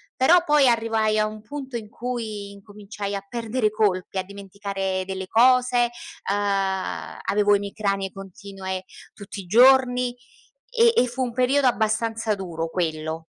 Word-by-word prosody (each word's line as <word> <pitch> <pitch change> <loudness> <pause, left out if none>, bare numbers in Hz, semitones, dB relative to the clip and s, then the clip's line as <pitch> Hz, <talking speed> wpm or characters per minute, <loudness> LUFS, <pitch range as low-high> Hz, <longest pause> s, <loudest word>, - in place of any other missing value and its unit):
Però 340 +7 +5
poi 295 -4 +4
arrivai 225 -2 +1
a 215 - +2
un 215 0 -8
punto 265 0 -6
in 215 -2 -8
cui 220 -5 -5
incominciai 205 0 -7
a 195 - -5
perdere 230 -1 -1
colpi, 195 -3 0
a 185 - 0
dimenticare 195 -1 -4
delle 190 -1 -5
cose, 245 +1 +4 0.4
uhm, 195 -2 -1
avevo 205 0 +2
emicranie 200 -1 -2
continue 195 -1 -7 0.3
tutti 200 -1 -8
i - - -13
giorni, 250 +2 +5 0.6
e 470 -1 +4
e 250 - +4
fu 250 +2 -5
un 245 - -2
periodo 260 +2 +2
abbastanza 220 -1 0
duro 165 -4 -5
quello. 160 -2 -3
215 Hz, 140 wpm, -24 LUFS, 195-245 Hz, 0.6 s, Però